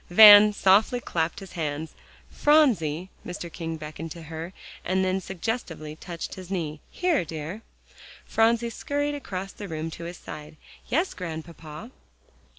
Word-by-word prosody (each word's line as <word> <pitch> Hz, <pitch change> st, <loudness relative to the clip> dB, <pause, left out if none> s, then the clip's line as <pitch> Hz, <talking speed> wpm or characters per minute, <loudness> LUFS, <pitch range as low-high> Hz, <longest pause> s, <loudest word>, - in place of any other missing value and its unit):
Van 210 Hz, +2 st, +10 dB
softly 205 Hz, +4 st, +4 dB
clapped 165 Hz, -4 st, -2 dB
his 195 Hz, -, -10 dB
hands. 155 Hz, -2 st, -3 dB, 0.4 s
"Phronsie," 190 Hz, -, +3 dB
Mr. 175 Hz, -1 st, -7 dB
King 165 Hz, -1 st, -4 dB
beckoned 155 Hz, +1 st, -7 dB
to 170 Hz, -, -10 dB
her, 160 Hz, +2 st, -6 dB, 0.3 s
and 190 Hz, +1 st, +1 dB
then 185 Hz, +1 st, 0 dB
suggestively 185 Hz, -6 st, -4 dB
touched 170 Hz, +1 st, -6 dB
his 185 Hz, -2 st, -9 dB
knee, 160 Hz, -6 st, -3 dB
"here, 355 Hz, -, +1 dB
dear." 160 Hz, +5 st, -6 dB, 0.6 s
Phronsie 230 Hz, +1 st, +2 dB
scurried 290 Hz, +4 st, -2 dB
across 195 Hz, -9 st, -5 dB
the 205 Hz, -, -8 dB
room 160 Hz, -1 st, -4 dB
to 170 Hz, -, -7 dB
his 175 Hz, 0 st, -6 dB
side. 150 Hz, 0 st, -9 dB, 0.3 s
"Yes, 335 Hz, +8 st, +1 dB
Grandpapa." 165 Hz, +3 st, -7 dB
180 Hz, 140 wpm, -26 LUFS, 160-215 Hz, 0.6 s, Van